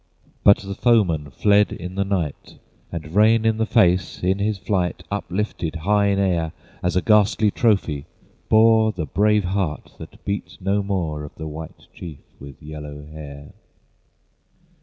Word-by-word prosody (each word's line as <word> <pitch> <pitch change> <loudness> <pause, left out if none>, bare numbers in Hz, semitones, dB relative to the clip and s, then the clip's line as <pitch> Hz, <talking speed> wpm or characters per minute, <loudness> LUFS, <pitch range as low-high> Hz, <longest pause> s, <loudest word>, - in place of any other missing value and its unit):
But 100 - +7
the 100 0 -7
foemen 95 - +2
fled 105 +9 +3
in 90 +1 -6
the 100 +1 0
night, 90 -7 -3 0.3
And 80 -1 -7
Rain 110 +2 +4
in 110 -1 +2
the 110 0 0
Face, 95 -7 +2
in 95 +2 +1
his 105 0 0
flight 95 -2 -2
Uplifted 100 -4 -3
high 100 +5 +2
in 100 -1 +1
air 85 -5 0 0.3
As 90 0 -1
a 95 - +1
ghastly 105 0 +3
trophy, 95 - 0 0.4
bore 110 0 +5
The 90 -6 -4
brave 105 +4 +2
heart, 90 -4 -3
that - - -12
beat 100 -3 -4
no 100 +2 0
more, 85 -7 -2
Of 75 - -10
the 80 - -7
White 80 +1 -8
Chief 80 -5 -9 0.2
with 70 0 -12
yellow 75 -1 -8
hair. 75 -2 -10
95 Hz, 155 wpm, -22 LUFS, 80-105 Hz, 0.4 s, But